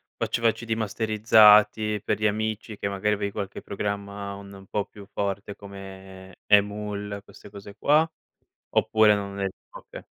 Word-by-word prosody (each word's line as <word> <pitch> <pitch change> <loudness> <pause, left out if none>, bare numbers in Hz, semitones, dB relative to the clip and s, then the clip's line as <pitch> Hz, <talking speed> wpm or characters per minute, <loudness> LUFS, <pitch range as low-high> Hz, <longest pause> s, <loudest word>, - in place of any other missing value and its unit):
faceva 115 0 +1
CD 115 - -11
masterizzati 105 -1 +4
per - - -1
gli 105 - 0
amici 110 0 -2
che 100 - -2
magari 100 +1 0
avevi 100 0 -3
qualche 100 -2 -5
programma 100 0 -4
un 100 -1 -12
po' 105 -1 -1
più 105 -1 -13
forte 100 0 -3
come 95 -1 -11
eMule 105 0 +1
queste 105 - -15
cose 100 0 -11
qua, 155 +3 +3 0.6
oppure 110 -1 +4
non 100 -1 -5
eri 95 -1 -2 0.2
oka - - -11
100 Hz, 140 wpm, -25 LUFS, 100-105 Hz, 0.6 s, masterizzati